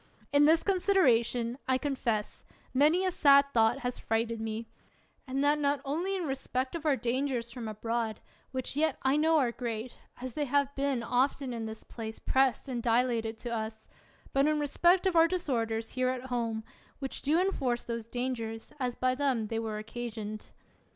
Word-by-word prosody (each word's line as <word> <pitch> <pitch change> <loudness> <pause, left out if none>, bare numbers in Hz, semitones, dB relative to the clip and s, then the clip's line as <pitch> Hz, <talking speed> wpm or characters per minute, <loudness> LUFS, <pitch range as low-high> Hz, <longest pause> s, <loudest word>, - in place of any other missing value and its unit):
In 285 0 +6
this 320 +2 +5
consideration, 260 - +2
I 260 -1 +3
confess, 250 -7 -2 0.3
many 305 +8 +4
a 370 - +2
sad 280 -4 +6
thought 225 -1 +3
has 245 0 -3
frighted 225 0 -1
me: 225 +1 -3 0.6
and 270 +2 -1
that 295 +1 +3
not 285 -1 +1
only 340 +8 -1
in 370 - -2
respect 265 -2 -2
of 325 -2 -3
our 290 - +4
dangers 245 -1 -1
from 235 -2 -6
abroad, 225 0 -2 0.3
which 260 0 -4
yet 315 +2 +1
I 265 +1 +3
know 320 +2 +4
are 255 -5 +2
great, 235 0 -5 0.2
as 255 -1 -6
they 300 -1 -1
have 280 +1 +1
been 275 -3 0
often 255 +2 0
in 225 -1 -4
this 220 0 -8
place 220 -1 -7
prest 265 -1 +1
and 245 -3 -3
dilated 230 -1 +1
to 240 -1 -4
us; 220 0 -5 0.5
but 275 +1 +4
in 305 0 +2
respect 345 +6 +3
of 375 -2 +2
our 330 0 +7
disorders 230 -11 -1
here 255 -1 +1
at 255 0 -4
home, 230 -2 -1 0.3
which 270 -1 -5
do 310 +4 +2
inforce 270 -11 0
those 230 -1 -5
dangers, 230 -2 -4
as 250 -2 -1
by 255 0 +1
them 255 -5 0
they 225 - -1
were 220 -1 -3
occasioned. 215 -1 -6
255 Hz, 180 wpm, -30 LUFS, 230-285 Hz, 0.6 s, our